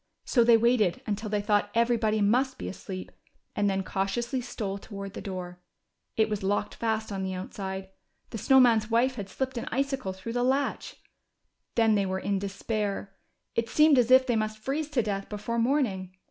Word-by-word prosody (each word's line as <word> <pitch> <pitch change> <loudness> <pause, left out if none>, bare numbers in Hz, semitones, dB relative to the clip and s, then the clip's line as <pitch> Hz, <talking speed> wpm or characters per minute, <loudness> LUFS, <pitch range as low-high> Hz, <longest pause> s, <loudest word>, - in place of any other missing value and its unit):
So 240 - +4
they 230 0 +6
waited 230 -2 +2
until 215 -1 -3
they 205 -1 0
thought 205 -1 +2
everybody 230 -2 +2
must 255 +6 +2
be - - -5
asleep, 185 -1 -7 0.4
and 205 0 +2
then 195 0 0
cautiously 235 +7 -2
stole 205 -5 -4
toward 200 -1 -8
the - - -6
door. 180 -2 -6 0.6
It 220 -1 +4
was 210 -2 -3
locked 205 +1 -1
fast 220 -1 -2
on 195 -1 -3
the 190 0 -3
outside. 190 +1 -5 0.4
The 225 - -4
Snow 265 +6 +5
Man's 230 -4 +4
wife 240 +3 +3
had 205 -5 -6
slipped 260 +3 -3
an - - -5
icicle 270 -5 -1
through 190 +5 -7
the 245 - 0
latch. 270 +3 0 0.8
Then 225 -2 +4
they 200 -2 +2
were 190 0 -1
in 195 +1 -1
despair. 200 0 -3 0.4
It 230 0 -1
seemed 300 -1 +5
as 240 -1 +2
if 260 0 +7
they 245 -2 +1
must 215 0 -1
freeze 280 +7 -3
to 265 -6 +1
death 200 -2 -3
before 215 +3 -3
morning. 230 -8 0
215 Hz, 190 wpm, -28 LUFS, 195-245 Hz, 0.8 s, if